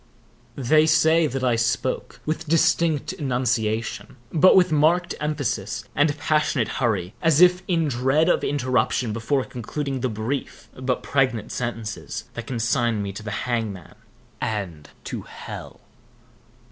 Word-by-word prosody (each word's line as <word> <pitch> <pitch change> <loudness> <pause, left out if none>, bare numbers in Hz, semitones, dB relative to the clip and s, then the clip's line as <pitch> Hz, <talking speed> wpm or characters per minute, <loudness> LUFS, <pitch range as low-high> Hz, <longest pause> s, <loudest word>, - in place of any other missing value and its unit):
They 155 +4 +3
say 160 0 +4
that 135 -1 -3
I 125 -2 +3
spoke 115 0 -1
with 155 +1 -3
a - - -8
distinct 165 0 +2
enunciation, 120 - -1 0.2
but 170 +4 +6
with 185 -2 +5
marked 160 +4 +3
emphasis 115 -9 -2
and 145 0 +2
passionate 150 0 +1
hurry, 100 -7 0
as 160 -2 +3
if 180 0 +6
in 165 -4 +1
dread 135 +5 +2
of - - +2
interruption 125 -4 0
before 125 +5 0
concluding 135 +3 -4
the 130 - -1
brief 110 +5 -4
but 130 -1 -2
pregnant 130 -6 0
sentences 110 - -4
that 120 -1 -7
consigned 115 -2 0
me 100 - -4
to 105 - -7
the 105 - -6 0.2
hangman 110 -7 -3 0.5
and 95 -9 -4
to - - -5
hell. - - -9
130 Hz, 135 wpm, -23 LUFS, 115-150 Hz, 0.5 s, but